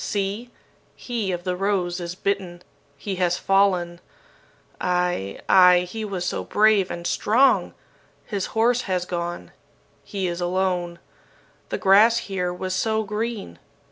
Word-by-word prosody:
See! 205 +4 -3 0.5
he 230 -6 -3
of 175 -1 -4
the 180 -1 -2
rose 185 -2 -1
is 175 0 -5
bitten. 185 -3 -3 0.3
He 190 +6 -5
has 180 -1 +1
fallen. 185 -3 +1 0.8
Ay! 180 - -1
ay! 180 -1 +7
He 220 +4 -6
was 190 -4 -4
so - - -2
brave 210 -3 +3
and 170 0 -6
strong! 250 +9 +2 0.5
His 200 -4 -3
horse 240 +2 +3
has 180 -1 0
gone. 175 -1 -5 0.5
He 195 -2 -4
is 175 0 -3
alone. 175 -1 -1 0.7
The - - -2
grass 210 +4 +5
here 190 -6 -2
was 185 +1 -4
so 220 +3 0
green. 210 - -4
185 Hz, 135 wpm, -23 LUFS, 175-205 Hz, 0.8 s, ay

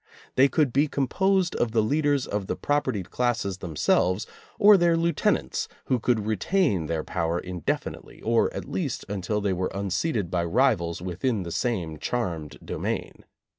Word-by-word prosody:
They 135 +2 +6
could 140 -3 +1
be 145 +3 +3
composed 185 +7 +1
of 115 -2 0
the 110 -2 +3
leaders 145 +2 +1
of 100 -2 -3
the - - -1
propertied 145 -11 -1
classes 115 -6 -1
themselves 90 +3 +1 0.3
or 205 +1 +8
their 170 -3 +4
lieutenants, 170 0 0 0.2
who 130 - +1
could 115 -2 +1
retain 110 - +1
their 80 -1 -1
power 85 -1 -1
indefinitely, 90 -2 -4
or 115 +1 +2
at - - -5
least 150 -9 -3
until 100 +1 -2
they 100 -2 +1
were 90 +1 -1
unseated 100 - -1
by 85 -1 +1
rivals 85 -5 +1
within 95 +4 -1
the 85 - -6
same 90 -5 -2
charmed 85 - -3
domain. - - -4
110 Hz, 155 wpm, -26 LUFS, 90-140 Hz, 0.3 s, or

